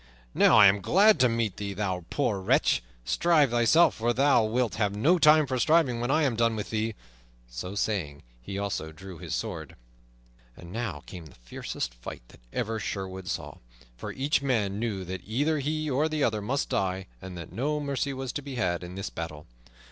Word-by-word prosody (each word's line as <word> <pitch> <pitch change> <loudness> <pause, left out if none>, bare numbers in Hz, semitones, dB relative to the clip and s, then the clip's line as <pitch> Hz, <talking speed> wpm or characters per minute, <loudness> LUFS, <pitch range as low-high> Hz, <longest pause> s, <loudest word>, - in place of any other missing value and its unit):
"Now - - +5
I 105 - +9
am 100 +1 +5
glad 200 - +5
to 125 -1 +5
meet 115 -4 -1
thee, 100 -1 -4
thou 95 -4 -2
poor 115 -9 0
wretch! 95 - +2 0.2
Shrive 155 - +3
thyself, 120 +8 +5
for 120 +2 0
thou 135 -2 +4
wilt 115 +2 0
have 105 -2 0
no 160 - +3
time 155 0 +6
for 130 -2 -2
shriving 140 -3 +3
when 120 - -1
I 155 +3 +3
am 130 -5 +1
done 115 0 +2
with 105 - -5
thee." 110 0 -1 0.5
So - - -6
saying, 90 -9 -2 0.2
he 95 +11 -6
also 100 -6 -3
drew 90 +1 -11
his - - -4
sword. - - -5 0.8
And 85 - -11
now 115 +3 -4
came 85 -4 -9
the 70 - -17
fiercest - - -5
fight - - -9
that - - -17
ever 110 +1 -2
Sherwood 95 -2 -5
saw; - - -5 0.4
for - - -6
each 140 +1 0
man 105 -7 0
knew 105 -5 -2
that 90 0 -5
either 145 +8 0
he 155 +2 -2
or 150 +3 +1
the 155 -2 -1
other 110 -2 +1
must 135 +7 -1
die, 95 -1 -1 0.2
and 95 -1 -8
that 85 - -8
no 145 +8 -1
mercy 140 -1 -2
was 130 -2 -4
to 145 - -4
be 140 -2 -7
had 90 -6 -1
in 90 +1 -8
this 95 +1 -5
battle. 75 -2 -6
110 Hz, 200 wpm, -27 LUFS, 95-140 Hz, 0.8 s, I